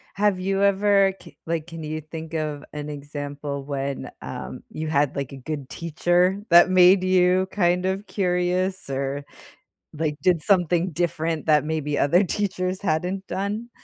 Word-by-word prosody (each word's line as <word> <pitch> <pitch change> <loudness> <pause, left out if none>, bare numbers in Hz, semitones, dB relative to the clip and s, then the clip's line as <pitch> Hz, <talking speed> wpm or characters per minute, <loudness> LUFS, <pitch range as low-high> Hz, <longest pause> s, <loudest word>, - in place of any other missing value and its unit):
Have 200 -2 +2
you 195 +1 0
ever 200 -1 +4
k - - -15
like, 165 -1 -2
can 165 -2 -8
you 155 +1 -4
think 160 +1 -8
of 155 -2 -3
an 150 0 -5
example 145 -1 -5
when, 140 -1 -4
um, - - -7
you 155 0 -5
had, 145 -2 +1
like, 140 -2 -3
a 135 - -8
good 140 0 -6
teacher 175 +4 +1
that 175 +1 +7
made 185 +1 +6
you 185 0 +3
kind 180 -2 +1
of 190 +2 -2
curious 180 -1 0
or, 135 +1 -2 0.7
like, 155 -1 -2
did 180 -3 +3
something 180 0 +2
different 165 -1 -1
that 150 -2 +4
maybe 150 -2 -2
other 175 +7 +4
teachers 185 -1 -2
hadn't 185 +2 -1
done? 210 +5 -3
170 Hz, 155 wpm, -24 LUFS, 150-185 Hz, 0.7 s, that